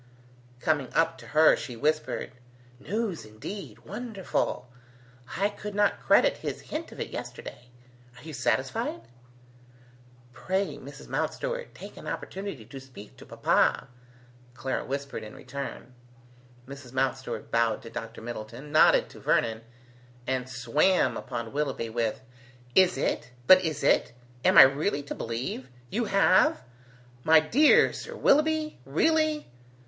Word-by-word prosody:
Coming 145 -3 0
up 165 -5 +2
to 120 - -12
her 155 +4 +5
she 125 - -7
whispered: 155 +6 -1 0.5
"News, 200 +4 -3
indeed! 110 - -9
Wonderful! 205 - -3 0.7
I 200 +2 +2
could 210 0 -8
not 205 0 +2
credit - - +4
his - - -5
hint - - -6
of - - -11
it - - -4
yesterday. 120 - -8 0.5
Are - - -14
you 160 0 -8
satisfied?" 130 -2 -1 1.3
"Pray, 190 +8 -2
Mrs. - - -11
Mountstuart, - - -3
take - - -11
an - - -10
opportunity 190 - -5
to 135 - -9
speak 130 -6 -13
to - - -13
papa," 135 - +1 0.7
Clara 130 +2 -2
whispered 140 +1 -4
in 105 - -10
return. 140 -2 -7 0.7
Mrs. 140 -2 -10
Mountstuart 130 -3 -2
bowed 115 -2 +1
to 115 - -10
Dr. 115 0 -7
Middleton, 120 +4 -7
nodded 155 - +5
to - - -13
Vernon, 110 -1 +1 0.6
and 130 -1 -2
swam 135 +9 +2
upon 115 0 -5
Willoughby, 135 -6 -2
with, 115 0 -1 0.5
"Is 185 -6 +5
it? 130 - -1 0.2
But 185 +3 +8
is 155 -4 -2
it? - - +3 0.3
Am - - +4
I - - +13
really 145 +3 +1
to 140 - -5
believe? 125 +3 -4 0.2
You 235 +2 0
have? 200 - +4 0.6
My 160 0 +7
dear 250 - +5
Sir - - -7
Willoughby? 310 +1 +2
Really?" 310 - +1
140 Hz, 135 wpm, -27 LUFS, 125-190 Hz, 1.3 s, I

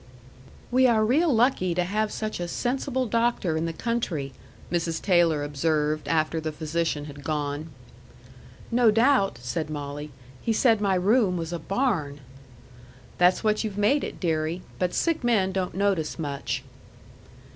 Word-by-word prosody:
"We 255 +1 +5
are 220 -3 +3
real 300 +8 +3
lucky 225 -7 +2
to 180 - +2
have 210 +4 -1
such 215 -3 -4
a 175 - -3
sensible 260 - -1
doctor 230 -7 0
in 160 +1 -1
the - - -2
country," 165 - -2 0.4
Mrs. 165 -2 -1
Taylor 170 -5 +3
observed, 150 +1 0
after 160 0 +1
the 155 0 -3
physician 155 -1 -2
had 145 -1 -10
gone. 150 +1 -3 1.0
"No 235 -1 +5
doubt," 225 - +3
said 155 +6 -3
Molly. 145 0 -5 0.3
"He 225 - 0
said 225 -1 +3
my 195 -2 +2
room 195 0 +3
was 165 0 -4
a 170 - -3
barn." 165 - -1 1.0
"That's 180 +4 +4
what 215 0 +1
you've 210 -2 -4
made 260 +8 +3
it, - - -6
deary. 160 0 -1 0.2
But 180 -1 0
sick 330 -5 0
men 210 -6 +2
don't 185 -2 -2
notice 190 -5 0
much." 145 -4 -3
180 Hz, 150 wpm, -26 LUFS, 155-225 Hz, 1.0 s, We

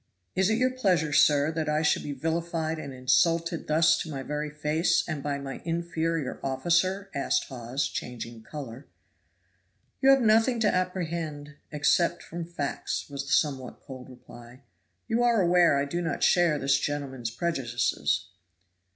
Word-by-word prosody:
"Is 190 +1 +2
it 220 - +2
your 255 +1 +2
pleasure, 180 - +1
sir, 145 +1 +4
that 160 -1 -2
I 150 +1 +1
should 150 - +2
be 145 - -5
vilified 160 +2 -2
and 140 -3 -7
insulted 165 +7 +1
thus 160 +1 +4
to 160 - -5
my 135 -3 -5
very 150 +2 -3
face, 150 +3 +1
and 155 -4 -3
by 145 0 -2
my 140 -1 -7
inferior 165 -3 -2
officer?" 175 +9 0
asked 140 - 0
Hawes, 130 +2 -3
changing 120 -3 -6
color. 130 +1 -9 1.1
"You 270 - +5
have 270 -2 +6
nothing 225 +2 +4
to 210 - +3
apprehend 165 -5 -3
except 170 +4 +1
from 170 0 -6
facts," 150 -3 -4
was 140 0 -5
the - - 0
somewhat 135 -5 0
cold 130 -1 -11
reply. 125 0 -14 0.4
"You 230 +1 +1
are 240 -2 +3
aware 175 -4 +4
I 140 - +1
do 170 +5 -3
not 165 -1 -2
share 175 -4 +4
this 140 -1 +2
gentleman's 135 -5 -3
prejudices." 120 -2 -1
155 Hz, 155 wpm, -27 LUFS, 140-170 Hz, 1.1 s, have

